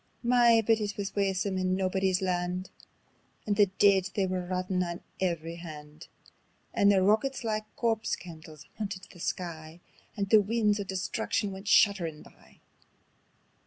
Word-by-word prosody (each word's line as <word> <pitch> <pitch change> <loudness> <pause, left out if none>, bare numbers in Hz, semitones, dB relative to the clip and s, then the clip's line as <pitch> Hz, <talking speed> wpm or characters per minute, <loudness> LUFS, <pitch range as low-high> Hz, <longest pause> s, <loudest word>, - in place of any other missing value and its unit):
My! 235 -2 +5
but 225 0 +3
it 205 -1 -3
wis 200 -1 -4
waesome 195 -1 0
on 185 0 +1
Naebuddy's 190 0 0
Land, 180 0 -2 0.7
And 205 - 0
the 205 -1 +5
deid 195 0 +3
they 195 - +2
were 185 -1 -2
rottin' 185 0 -1
on 170 -1 -3 0.2
every 170 -2 -2
hand. 155 -2 -10 0.7
And 200 0 +4
the 190 -2 +3
rockets 235 +7 +1
like 215 -1 -2
corpse 225 -2 0
candles 160 -4 -12
hauntit 200 -2 -5
the 175 - -15
sky, 165 -2 -5 0.4
And 200 -1 -1
the 215 -2 +8
winds 210 0 +1
o' - - -1
destruction 195 +2 -2
went 195 +1 -9
shudderin' 175 -7 +3
by. - - -21
190 Hz, 150 wpm, -29 LUFS, 180-205 Hz, 0.7 s, the